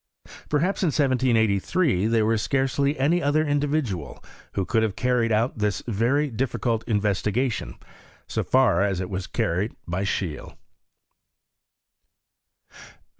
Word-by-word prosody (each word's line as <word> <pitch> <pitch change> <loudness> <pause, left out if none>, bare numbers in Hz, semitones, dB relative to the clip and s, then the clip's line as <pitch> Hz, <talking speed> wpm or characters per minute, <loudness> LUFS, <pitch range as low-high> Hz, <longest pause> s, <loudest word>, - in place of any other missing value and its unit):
Per 150 - +2
haps 185 +6 0
in 185 - +2
1783 125 - +2
there 115 -1 +2
was 110 -1 +1
scarcely 140 +3 0
any 160 +6 +2
other 155 +2 +2
indi 145 0 +1
vidual 115 - -2 0.4
who 95 - -1
could 115 +2 +1
have 110 -4 -1
carried 125 -2 +1 0.2
this 105 -3 -1
very 125 +7 +1
difficult 115 -1 -1
investigation 105 +3 -1 0.5
so - - -2
far 130 -9 +3
as 100 -2 0
it 90 +1 -4
was 95 -1 -4
carried 95 +6 -1
by 90 +3 -2
Scheele. 95 -6 -3
115 Hz, 125 wpm, -24 LUFS, 100-140 Hz, 0.5 s, far